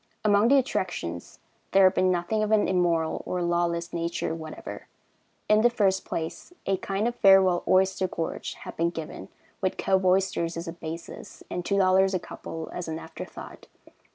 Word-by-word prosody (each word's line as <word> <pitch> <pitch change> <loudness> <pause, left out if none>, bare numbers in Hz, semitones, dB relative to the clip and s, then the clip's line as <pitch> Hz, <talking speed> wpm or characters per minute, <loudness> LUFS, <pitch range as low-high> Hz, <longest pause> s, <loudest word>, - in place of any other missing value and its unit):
Among 205 +1 +5
the 280 +3 +6
attractions 175 - -2 0.4
there 195 0 +6
had 185 0 +6
been 185 -1 +2
nothing 180 +5 0
of 215 0 0
an 215 -1 +4
immoral 170 -3 +1
or 180 -1 -2
lawless 170 0 0
nature 170 -1 -2
whatever. 160 -1 -8 0.6
In 215 0 +5
the 240 - +5
first 195 -5 +1
place, 160 - -5
a 195 -1 +1
kind 195 +4 -1
of 240 - -2
farewell 190 -4 +5
oyster 190 0 +3
gorge 165 -2 -4
had - - -9
been 170 +1 +1
given, 165 -2 -7 0.3
with 185 -1 -1
cove 190 0 +1
oysters 185 -3 +1
as 170 - -5
a 165 - -4
basis, 165 0 -8
and 180 - -3
$2 190 0 +3
a - - +1
couple 160 -1 -8
as 180 - -5
an 160 0 -3
after 160 - -8
thought. - - -11
185 Hz, 175 wpm, -26 LUFS, 170-195 Hz, 0.6 s, the